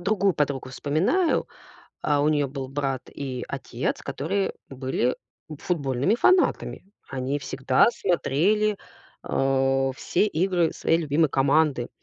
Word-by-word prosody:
другую 195 Hz, 0 st, +2 dB
подругу 140 Hz, -3 st, -1 dB
вспоминаю. 190 Hz, -, +1 dB, 0.6 s
А, 145 Hz, -1 st, +2 dB
у 150 Hz, -, +3 dB
неё 145 Hz, -3 st, +1 dB
был 135 Hz, -1 st, -6 dB
брат 135 Hz, -2 st, -2 dB
и 130 Hz, -3 st, -5 dB
отец, 130 Hz, -2 st, -3 dB
которые 190 Hz, +7 st, -2 dB, 0.2 s
были 130 Hz, -2 st, -1 dB, 0.4 s
футбольными 140 Hz, -, 0 dB
фанатами. 365 Hz, -, +2 dB, 0.2 s
Они 135 Hz, +2 st, -2 dB
всегда 130 Hz, -1 st, +2 dB
смотрели, 205 Hz, -, +1 dB, 0.5 s
э, 135 Hz, 0 st, +1 dB
все 210 Hz, -, +1 dB
игры 180 Hz, -2 st, +1 dB
своей 165 Hz, -, +1 dB
любимой 155 Hz, 0 st, +2 dB
команды. 135 Hz, -2 st, +2 dB
145 Hz, 115 wpm, -25 LUFS, 135-180 Hz, 0.6 s, у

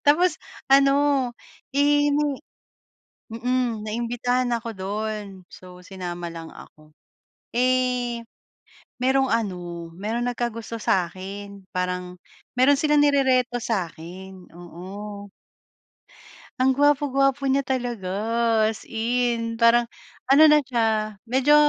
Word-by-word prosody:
Tapos 345 Hz, +5 st, +4 dB, 0.3 s
ano, 275 Hz, 0 st, +6 dB, 0.8 s
eh 290 Hz, 0 st, +4 dB
may 295 Hz, -1 st, +1 dB, 1.0 s
mm, 240 Hz, -1 st, -1 dB
naimbitahan 245 Hz, +2 st, -1 dB
ako 235 Hz, 0 st, -2 dB
dun 210 Hz, +2 st, -3 dB, 0.2 s
so 180 Hz, 0 st, -13 dB
sinama 175 Hz, -2 st, -6 dB
lang 165 Hz, -1 st, -9 dB
ako. 155 Hz, 0 st, -15 dB, 0.6 s
Eh, 250 Hz, -1 st, +1 dB, 0.7 s
merong 265 Hz, +1 st, +2 dB
ano, 175 Hz, -6 st, -3 dB
meron 225 Hz, +6 st, -2 dB
nagkagusto 230 Hz, -2 st, -3 dB
sa'kin, 195 Hz, 0 st, -3 dB
parang 180 Hz, 0 st, -3 dB, 0.4 s
meron 270 Hz, +3 st, +5 dB
silang 300 Hz, -1 st, +3 dB
nirereto 260 Hz, -4 st, +3 dB
sa 210 Hz, -7 st, 0 dB
akin 185 Hz, +3 st, -11 dB
oo. 195 Hz, +4 st, -9 dB, 1.3 s
Ang 260 Hz, 0 st, +3 dB
gwapo-gwapo 275 Hz, -1 st, +2 dB
niya 275 Hz, +1 st, +2 dB
talaga 245 Hz, -7 st, -3 dB, 0.6 s
as 220 Hz, -, -6 dB
in 230 Hz, 0 st, -1 dB
parang, 235 Hz, +1 st, +4 dB, 0.4 s
ano 275 Hz, +3 st, +7 dB
na 300 Hz, -, +6 dB
siya 220 Hz, -5 st, 0 dB
medyo 265 Hz, +5 st, +3 dB
230 Hz, 100 wpm, -24 LUFS, 195-255 Hz, 1.3 s, ano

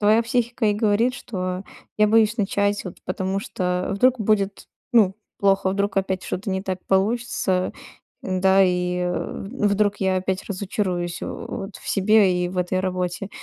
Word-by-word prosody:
твоя 215 Hz, +2 st, +4 dB
психика 235 Hz, 0 st, 0 dB
и 210 Hz, -, +3 dB
говорит, 220 Hz, +4 st, +2 dB
что: 185 Hz, -5 st, -4 dB, 0.4 s
"Я 210 Hz, -, +6 dB
боюсь 220 Hz, +1 st, +4 dB
начать, 205 Hz, -1 st, 0 dB
вот 180 Hz, -, -8 dB
потому 190 Hz, +1 st, -2 dB
что 180 Hz, -2 st, -2 dB
вдруг 250 Hz, +5 st, +3 dB
будет, 200 Hz, -2 st, 0 dB, 0.3 s
ну 205 Hz, -5 st, +5 dB, 0.2 s
плохо, 195 Hz, -1 st, +2 dB
вдруг 200 Hz, +1 st, -1 dB
опять 190 Hz, -1 st, 0 dB
что-то 195 Hz, +2 st, -3 dB
не 190 Hz, 0 st, -1 dB
так 190 Hz, -2 st, -3 dB
получится, 195 Hz, -2 st, +1 dB, 0.5 s
н-да? 190 Hz, +1 st, +3 dB
И, 180 Hz, 0 st, 0 dB
э, 180 Hz, -1 st, -2 dB, 0.2 s
вдруг 205 Hz, -3 st, +1 dB
я 190 Hz, -1 st, +1 dB
опять 190 Hz, 0 st, -2 dB
разочаруюсь, 185 Hz, -3 st, -3 dB
э, -, -, -3 dB
вот 195 Hz, +1 st, -6 dB
в -, -, -11 dB
себе 195 Hz, -3 st, +3 dB
и 175 Hz, -, -1 dB
в 180 Hz, 0 st, -5 dB
этой 180 Hz, +1 st, 0 dB
работе". 185 Hz, 0 st, -2 dB
195 Hz, 160 wpm, -23 LUFS, 185-210 Hz, 0.5 s, Я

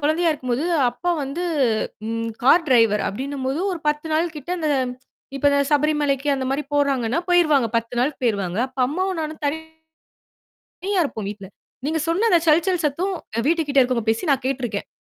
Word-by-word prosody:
கொழந்தையா 320 Hz, +3 st, +2 dB
இருக்கும்போது 255 Hz, 0 st, -2 dB, 0.3 s
அப்பா 350 Hz, +9 st, -3 dB
வந்து 280 Hz, +6 st, -4 dB, 0.7 s
ம். 230 Hz, 0 st, -2 dB
கார் 325 Hz, +6 st, +5 dB
டிரைவர் 225 Hz, -5 st, +4 dB
அப்டின்னும்போது 270 Hz, -, -3 dB
ஒரு 350 Hz, -, -4 dB
10 300 Hz, +2 st, -1 dB
நாள் 330 Hz, +1 st, 0 dB
கிட்ட 295 Hz, +3 st, -8 dB
அந்த 315 Hz, -2 st, -1 dB, 0.7 s
இப்ப 285 Hz, +1 st, +3 dB, 0.2 s
சபரிமலைக்கு 295 Hz, -1 st, +1 dB
அந்த 265 Hz, -, -3 dB
மாரி 275 Hz, +2 st, -1 dB
போறாங்கன்னா, 275 Hz, -3 st, +1 dB
போயிருவாங்க. 310 Hz, -8 st, +4 dB
10 230 Hz, +1 st, -2 dB
நாள்க்கு 265 Hz, +3 st, 0 dB
போயிருவாங்க. 200 Hz, -6 st, 0 dB
அப்ப 260 Hz, 0 st, -18 dB
அம்மாவும் 370 Hz, +6 st, -2 dB
நானும் 310 Hz, 0 st, -5 dB
தனியா 320 Hz, +2 st, -4 dB, 1.2 s
இருப்போம் 220 Hz, -8 st, -4 dB
வீட்ல. 200 Hz, -2 st, -8 dB, 0.4 s
நீங்க 320 Hz, +1 st, 0 dB
சொன்ன 375 Hz, +8 st, +2 dB
அந்த 345 Hz, -, +5 dB
சல் 315 Hz, +2 st, +5 dB
சல் 365 Hz, -3 st, +1 dB
சத்தம் 360 Hz, +7 st, -1 dB, 0.3 s
வீட்டுக்கிட்ட 310 Hz, -4 st, +2 dB
இருக்குறவங்க 245 Hz, -3 st, +1 dB
பேசி 225 Hz, +9 st, 0 dB
நான் 270 Hz, -1 st, +1 dB
கேட்ருக்கேன். 245 Hz, -6 st, -2 dB
285 Hz, 155 wpm, -22 LUFS, 250-320 Hz, 1.2 s, கார்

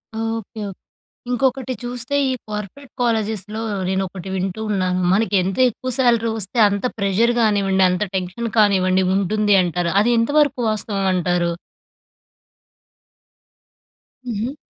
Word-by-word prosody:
Okay. -, -, -3 dB, 0.5 s
Okay. -, -, -7 dB, 0.6 s
ఇంకొకటి 255 Hz, +1 st, 0 dB
చూస్తే 245 Hz, +2 st, -4 dB
ఈ -, -, 0 dB, 0.2 s
కార్పొరేట్ 210 Hz, +6 st, -7 dB
కాలేజెస్‍లో, 220 Hz, -2 st, -1 dB, 0.3 s
నేనొకటి 190 Hz, -1 st, -3 dB
వింటూ 190 Hz, +2 st, -3 dB
ఉన్నాను. 185 Hz, -2 st, 0 dB
మనకి 210 Hz, +2 st, +1 dB
ఎంత 190 Hz, +1 st, -3 dB
ఎక్కువ 255 Hz, +3 st, -6 dB
స్యాలరీ 235 Hz, -3 st, +3 dB
వస్తే, 205 Hz, +3 st, -2 dB
అంత 200 Hz, +2 st, -3 dB
ప్రెజర్ 200 Hz, +4 st, +2 dB
గానివ్వండి. 200 Hz, -3 st, +2 dB
అంత 180 Hz, +2 st, -1 dB
టెన్షన్ 185 Hz, +6 st, -3 dB
కానివ్వండి 190 Hz, -3 st, +3 dB
ఉంటుంది 205 Hz, +2 st, +2 dB
అంటారు. 175 Hz, -1 st, -1 dB
అది 225 Hz, +3 st, +2 dB
ఎంతవరకు 285 Hz, +2 st, +2 dB
వాస్తవం 205 Hz, -2 st, -2 dB
అంటారు? 175 Hz, -1 st, 0 dB, 2.8 s
హుహు. 235 Hz, +4 st, -3 dB
210 Hz, 115 wpm, -20 LUFS, 190-235 Hz, 2.8 s, స్యాలరీ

